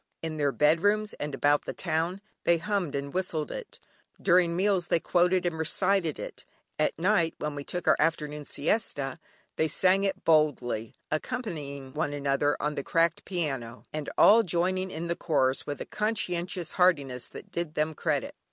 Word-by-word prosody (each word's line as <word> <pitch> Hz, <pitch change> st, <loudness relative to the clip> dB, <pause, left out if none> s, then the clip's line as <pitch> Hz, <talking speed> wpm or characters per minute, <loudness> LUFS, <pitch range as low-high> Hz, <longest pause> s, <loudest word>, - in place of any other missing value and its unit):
In 160 Hz, -1 st, -3 dB
their 145 Hz, -2 st, +2 dB
bedrooms, 205 Hz, +10 st, +2 dB
and 145 Hz, -1 st, -3 dB
about 145 Hz, 0 st, +2 dB
the -, -, -4 dB
town 170 Hz, +5 st, -1 dB, 0.2 s
they 170 Hz, -, +4 dB
hummed 180 Hz, -3 st, -2 dB
and 140 Hz, 0 st, -4 dB
whistled 175 Hz, -5 st, -1 dB
it, -, -, -8 dB, 0.4 s
during 175 Hz, -2 st, +3 dB
meals 190 Hz, -1 st, +1 dB
they 170 Hz, -, +2 dB
quoted 180 Hz, +2 st, +2 dB
and 165 Hz, -2 st, -1 dB
recited 180 Hz, 0 st, +2 dB
it. -, -, -7 dB, 0.4 s
At 155 Hz, -, +1 dB
night, 170 Hz, -2 st, +2 dB
and -, -, -9 dB
when 145 Hz, -, -8 dB
we 145 Hz, -, -5 dB
took 180 Hz, +5 st, -4 dB
our -, -, +6 dB
afternoon 150 Hz, -2 st, 0 dB
siesta, 145 Hz, -, -2 dB, 0.4 s
they 160 Hz, -, +2 dB
sang 185 Hz, +5 st, +3 dB
it 195 Hz, -, -2 dB
boldly, 130 Hz, -8 st, +2 dB, 0.2 s
accompanying 150 Hz, -, -4 dB
one 150 Hz, -1 st, -1 dB
another 140 Hz, 0 st, +1 dB
on 150 Hz, 0 st, -1 dB
the 140 Hz, -, -4 dB
cracked 165 Hz, +2 st, +1 dB
piano, 135 Hz, -10 st, -3 dB
and 155 Hz, -1 st, -3 dB
all 225 Hz, +3 st, +8 dB
joining 185 Hz, 0 st, 0 dB
in 170 Hz, -1 st, -5 dB
the 170 Hz, 0 st, -1 dB
chorus 135 Hz, -6 st, +1 dB
with 145 Hz, -1 st, -4 dB
a -, -, -4 dB
conscientious 185 Hz, -5 st, -2 dB
heartiness 140 Hz, -9 st, +2 dB
that -, -, -11 dB
did 170 Hz, -2 st, -3 dB
them 155 Hz, +1 st, 0 dB
credit. 150 Hz, -4 st, -1 dB
160 Hz, 170 wpm, -28 LUFS, 145-185 Hz, 0.4 s, all